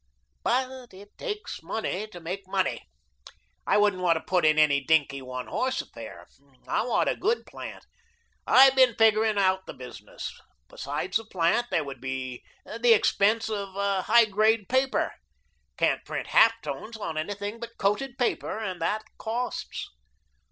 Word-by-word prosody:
But 255 -2 -2
it 205 +2 -15
takes 425 -3 -5
money 215 -1 -3
to 180 -5 -11
make 185 +4 -6
money. 190 - -1 0.8
I - - +4
wouldn't 205 -3 +2
want 170 -2 +3
to 160 - -2
put 180 -3 +1
in 155 0 +4
any 145 -3 +4
dinky, 145 -3 +2
one 130 -1 -6
horse 260 +1 -1
affair. - - -8 0.4
I - - +1
want 240 - +1
a - - +1
good 445 +5 0
plant. - - -9 0.6
I've 265 +1 +7
been 255 -4 +5
figuring 220 -1 +4
out 190 -1 +2
the - - -8
business. 120 -5 -8 0.4
Besides 150 +8 -2
the 225 - -9
plant, 190 +4 +1
there - - +1
would 135 -3 -8
be 130 -1 -5 0.2
the 230 +1 +4
expense 210 +2 +2
of 200 -3 -4
a 200 -1 0
high 235 +4 +5
grade 215 0 +2
paper. 260 +1 +1 0.6
Can't - - +1
print - - -5
half 230 0 +5
tones 220 +1 -6
on 165 -7 -5
anything 205 +7 -4
but 235 0 -9
coated 240 +6 -1
paper, 245 -3 -1
and 185 -6 -4
that 210 +6 0 0.2
COSTS. 240 +3 -4
205 Hz, 160 wpm, -27 LUFS, 170-230 Hz, 0.8 s, I've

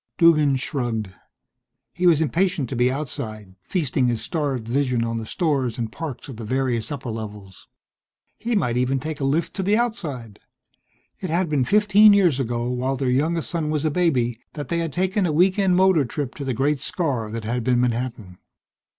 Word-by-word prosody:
Duggan 155 -5 +5
shrugged. 120 - -2 0.8
He 180 - +1
was 160 -3 +5
impatient 160 -1 +1
to - - -4
be 125 +1 +3
outside, 110 -8 -5
feasting 135 - 0
his 120 -2 0
starved 135 -5 -2
vision 125 -1 +1
on 115 0 -2
the 110 - -7
stores 140 - 0
and 115 -2 -3
parks 155 -6 -6
of 130 -5 -9
the 115 - -7
various 125 +1 -1
upper 135 -4 -4
levels. 105 -4 -8 0.7
He 235 0 -1
might 125 - +1
even 130 +2 +1
take 155 +2 -5
a - - -3
lift 145 +5 0
to - - 0
the 205 +3 +2
Outside. 150 - -3 0.8
It 185 - -4
had 170 +1 0
been 140 -4 +1
fifteen 210 +4 +6
years 175 -9 +3
ago, 120 -2 -1
while 130 +2 -1
their 130 -1 0
youngest 160 +5 0
son 165 -4 -1
was 155 0 -1
a 155 - +2
baby, 130 -9 +1
that 145 -3 -6
they 170 - 0
had 165 -2 -2
taken 190 +3 0
a - - 0
weekend 185 +3 +3
motor 185 -4 +4
trip 135 +1 -4
to 140 - -6
the 130 -2 -1
great 140 +4 +1
scar 135 - -2
that 115 +1 -5
had 120 +2 -2
been 125 0 +2
Manhattan. 115 -6 -2
135 Hz, 190 wpm, -23 LUFS, 120-165 Hz, 0.8 s, fifteen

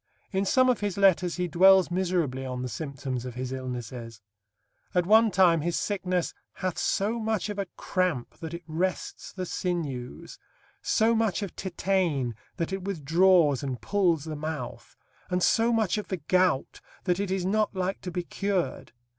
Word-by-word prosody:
In 195 0 0
some 255 +6 +4
of 250 -2 +2
his 205 -2 -2
letters 185 -3 +4
he 180 -1 -1
dwells 190 +2 +6
miserably 175 -8 0
on 125 -1 -4
the - - -2
symptoms 135 -4 -4
of 125 -2 -7
his 125 0 -4
illnesses. 125 -3 -6 0.8
At 180 -1 +3
one 220 +3 +6
time, 180 -4 +4
his 170 +2 -1
sickness 185 -4 -1 0.2
"hath 185 -2 -3
so 215 +4 0
much 220 -2 -1
of 205 -1 -4
a 195 - -2
cramp 180 -10 -1
that 165 0 -5
it 170 - -8
wrests 175 +4 -3
the 185 -1 -5
sinews, 165 -5 -4 0.4
so 225 +1 +3
much 220 -3 +1
of 195 - -6
tetane 175 -9 0 0.2
that 170 +2 -2
it 195 -1 -3
withdraws 170 -4 +3
and 130 -4 -3
pulls 175 -7 +1
the 155 -1 -5
mouth, 150 -4 -6 0.3
and 180 -1 0
so 230 +1 +3
much 220 -3 +1
of 210 - -7
the 185 - -2
gout... 180 -2 +1 0.2
that 180 -1 +1
it 200 -1 -1
is 190 -1 -1
not 210 +1 +1
like 185 +1 -2
to 180 - -5
be 180 0 -3
cured.... 185 - -2
180 Hz, 170 wpm, -27 LUFS, 150-195 Hz, 0.8 s, dwells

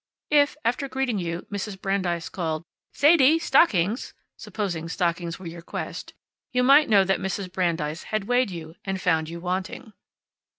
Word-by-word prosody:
If, 290 0 +4
after 245 +4 0
greeting 260 -5 -1
you, 170 -1 -4
Mrs. 200 -1 -4
Brandeis 185 -4 -1
called, 160 -3 -3 0.3
"Sadie! 300 0 +5
Stockings!" 235 - +2 0.2
(supposing 175 -6 -4
stockings 170 -1 -1
were 190 - -12
your 170 0 -7
quest), - - -6 0.4
you 250 0 +2
might 280 +3 +6
know 200 -3 +6
that 190 0 +1
Mrs. 190 -1 -4
Brandeis 165 -4 -1
had 215 -2 -2
weighed 245 +2 +2
you 165 -3 -8
and 195 -1 -3
found 160 -4 +1
you 170 +1 -7
wanting. 185 +6 -4
190 Hz, 155 wpm, -25 LUFS, 170-245 Hz, 0.4 s, might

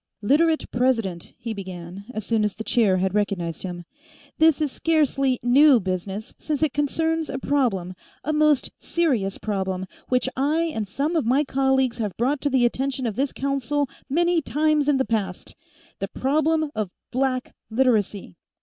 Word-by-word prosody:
"Literate 315 +7 +3
President," 230 -9 0
he 230 -1 -5
began, 185 -1 -8
as 215 -4 -5
soon 225 -2 +1
as 210 -2 -1
the 220 - -6
chair 215 -5 +3
had 190 0 0
recognized 195 -6 -1
him, 175 -2 -6 0.5
"this 320 -1 +5
is 300 -3 0
scarcely 275 -6 +1
new 265 +2 +6
business, 190 +2 -4
since 305 -1 -2
it 305 - +1
concerns 320 +2 0
a 270 - -3
problem, 235 -11 0 0.3
a 310 - -1
most 300 -2 +3
serious 250 - 0
problem, 190 -3 -2 0.2
which 250 0 +2
I 290 +5 +1
and 215 -2 -3
some 285 - -1
of 305 -8 +1
my 270 +5 +3
colleagues 265 -3 +1
have 210 -4 -3
brought 265 +4 0
to 290 - +1
the 260 -3 +3
attention 265 +2 -1
of 220 -4 -2
this 270 +2 0
Council 275 +1 -1 0.2
many 345 +3 +2
times 300 0 +1
in 285 - +4
the 265 - +1
past 200 -5 -3 0.5
the - - -2
problem 310 +2 +1
of 215 -3 -2 0.2
Black 255 0 -1 0.2
Literacy!" 220 - +1
260 Hz, 165 wpm, -24 LUFS, 205-290 Hz, 0.5 s, new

